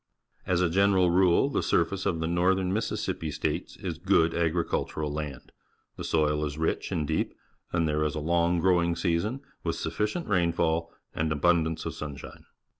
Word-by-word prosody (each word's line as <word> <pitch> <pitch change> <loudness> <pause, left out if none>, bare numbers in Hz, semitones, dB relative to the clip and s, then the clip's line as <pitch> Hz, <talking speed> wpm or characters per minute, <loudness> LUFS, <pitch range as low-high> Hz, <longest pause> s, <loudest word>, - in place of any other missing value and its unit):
As 90 -1 +2
a 90 - +3
general 95 -1 +4
rule, 90 +6 +4
the 140 - 0
surface 95 +3 +1
of 80 - 0
the - - 0
North 90 +3 +2
ern 95 -1 -1
Mississippi 105 -6 -2
States 75 +1 -3
is 85 -4 -5
good 85 -3 +3
agricultural 80 -3 -1
land. 75 -3 -6 0.4
The - - -7
soil 75 -1 +1
is 75 0 -3
rich 80 +1 -1
and 75 - -1
deep, - - -1 0.4
and 85 -2 +1
there 75 0 +1
is 75 +1 -1
a - - -2
long 85 +2 +2
growing 85 -1 +3
season, 95 +10 -1 0.2
with - - -1
sufficient 105 +12 -2
rainfall 85 -3 +1 0.2
and 80 0 -1
abundance 80 +1 +1
of - - -3
sunshine. 70 -2 -8
85 Hz, 170 wpm, -28 LUFS, 80-90 Hz, 0.4 s, general